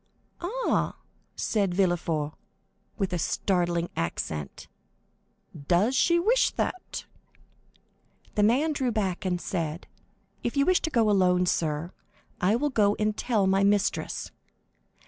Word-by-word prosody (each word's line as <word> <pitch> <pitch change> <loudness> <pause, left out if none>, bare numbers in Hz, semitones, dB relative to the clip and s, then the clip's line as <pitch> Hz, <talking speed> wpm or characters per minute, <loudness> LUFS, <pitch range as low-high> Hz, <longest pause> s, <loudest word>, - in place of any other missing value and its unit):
"Ah," 465 +9 0 0.4
said 200 -5 0
Villefort, 170 -5 0 0.6
with 195 -2 -1
a 175 - -1
startling 175 -1 0
accent; 75 -3 -4 1.0
"does 200 +9 +3
she 340 +6 +4
wish 450 +9 +3
that?" 370 - -4 1.3
The 210 - +1
servant 275 +8 +3
drew 255 -2 0
back 195 -5 -2
and 180 -1 0
said, 165 -3 -3 0.6
"If 240 +4 -3
you 280 - +4
wish 370 +2 +3
to 320 - -1
go 230 -7 +2
alone, 180 -3 +3
sir, 160 -1 -1 0.5
I 195 +5 +3
will 290 +4 0
go 205 -4 +3
and 215 0 0
tell 220 -4 +1
my 195 +1 +3
mistress." 205 0 0
200 Hz, 125 wpm, -27 LUFS, 175-240 Hz, 1.3 s, she